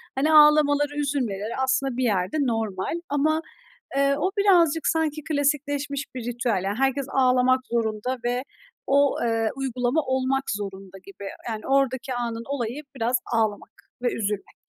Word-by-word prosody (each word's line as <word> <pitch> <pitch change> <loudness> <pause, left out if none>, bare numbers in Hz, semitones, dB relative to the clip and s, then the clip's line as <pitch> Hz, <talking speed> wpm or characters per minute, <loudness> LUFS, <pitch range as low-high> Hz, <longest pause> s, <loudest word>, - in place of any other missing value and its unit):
hani, 305 +4 +2
ağlamaları, 295 -1 +5
üzülmeleri 235 -7 -2
aslında 265 -1 0
bir 255 - 0
yerde 200 +2 0
normal. 225 - -2
Ama, 310 +2 +1 0.6
eee, 280 0 +3
o 375 - 0
birazcık 340 -6 +4
sanki 310 -2 0
klasikleşmiş 285 -1 -1
bir 245 -3 -5
ritüel, 240 -5 -1
ya, 200 +1 -1
herkes 270 +1 +1
ağlamak 255 -1 +3
zorunda 230 +2 -1
ve 245 +1 0 0.4
o, 280 0 +3
eee, 225 -1 +1
uygulama 255 +2 0
olmak 260 +1 0
zorunda 195 -2 -6
gibi. 200 0 -10 0.2
Yani, 215 -1 -5
oradaki 270 -1 +1
anın 235 -1 -3
olayı 265 0 -3
biraz 240 0 0 0.2
ağlamak 220 -3 0 0.3
ve 245 - 0
üzülmek. 210 -2 -3
260 Hz, 140 wpm, -24 LUFS, 230-285 Hz, 0.6 s, ağlamaları